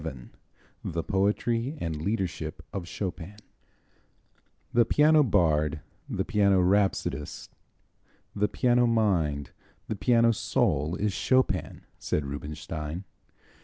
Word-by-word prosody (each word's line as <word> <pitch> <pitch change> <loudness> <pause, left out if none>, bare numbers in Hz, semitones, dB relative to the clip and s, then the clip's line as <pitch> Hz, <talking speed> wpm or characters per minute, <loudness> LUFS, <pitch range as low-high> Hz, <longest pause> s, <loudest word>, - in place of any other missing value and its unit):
VII 65 -2 -7 0.5
The 85 0 -3
Poetry 115 - 0
and 80 -2 -3
Leadership 95 -1 -3
of 95 -4 -4
Chopin 90 +2 -5 1.4
"The 120 - +5
piano 150 +4 +5
bard, 75 - +2 0.3
the - - -2
piano 100 -2 +3
rhapsodist, 90 -6 0 0.9
the 105 0 +2
piano 120 +3 +2
mind, 85 - +1 0.4
the 110 - -2
piano 115 +2 +4
soul 75 -6 0
is 105 +1 -1
Chopin," 130 +5 0
said 75 - -1
Rubinstein. 75 +4 -5
95 Hz, 100 wpm, -27 LUFS, 75-115 Hz, 1.4 s, The